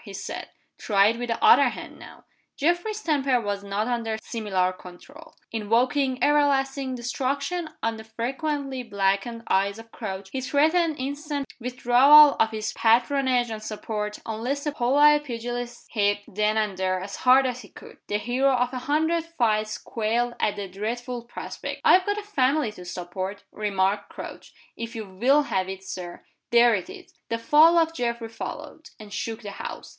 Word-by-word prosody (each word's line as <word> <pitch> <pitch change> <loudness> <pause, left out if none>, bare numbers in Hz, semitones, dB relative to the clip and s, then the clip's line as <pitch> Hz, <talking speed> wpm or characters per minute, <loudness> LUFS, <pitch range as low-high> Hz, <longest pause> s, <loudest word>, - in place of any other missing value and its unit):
he - - -10
said. - - -6 0.3
"Try 200 -1 +4
it 230 - -2
with 245 - -3
the 230 - -3
other 440 - +7
hand - - -9
now." - - -13 0.3
Geoffrey's 350 +8 0
temper 275 -5 +2
was 205 -2 -3
not 200 +2 -2
under 230 -3 -2
similar 190 -5 -1
control. 280 - -14 0.2
Invoking 250 +4 +1
everlasting 275 -2 +2
destruction 280 +7 -2
on 225 0 -1
the 220 - -9
frequently 265 +4 -3
blackened 200 +1 -1
eyes 200 +2 +1
of 225 0 -13
Crouch, 195 -3 -6
he 265 - -3
threatened 315 +4 +2
instant 285 +1 -4
withdrawal 255 +4 +6
of 225 - +4
his 220 0 -4
patronage 245 +1 +2
and 215 -1 -5
support 210 -1 -4
unless 245 +6 -3
the 295 - -1
polite 295 +3 +4
pugilist 240 -1 -5
hit, 205 -2 +2
then 210 +2 0
and 210 -4 -1
there, 185 0 0
as 195 +2 -7
hard 260 +1 +5
as 250 -1 -2
he 205 - -14
could. - - -14
The 205 - 0
hero 250 +5 +1
of 250 0 0
a 255 - -3
hundred 320 +3 +2
fights 215 -2 +1
quailed 235 +2 -1
at 210 - +1
the 200 -1 -5
dreadful 235 +5 -5
prospect. 240 - -7
"I've 370 +1 +6
got 410 0 0
a 420 - -4
family 285 - +1
to 180 -4 -12
support," 185 +2 -5
remarked 200 -1 -1
Crouch. - - -9 0.2
"If 230 +1 -6
you 220 -1 -5
will 250 +10 +3
have 190 -8 -1
it, 190 0 -7
Sir 180 -2 -8 0.2
there 235 0 +6
it 185 - -5
is!" - - -12 0.2
The 230 - 0
fall 305 +8 +5
of 325 -1 +3
Geoffrey 235 -4 -2
followed, 300 +7 -8
and 210 -2 -11
shook 225 +1 -4
the 205 - -6
house. - - -7
240 Hz, 170 wpm, -25 LUFS, 210-280 Hz, 0.3 s, other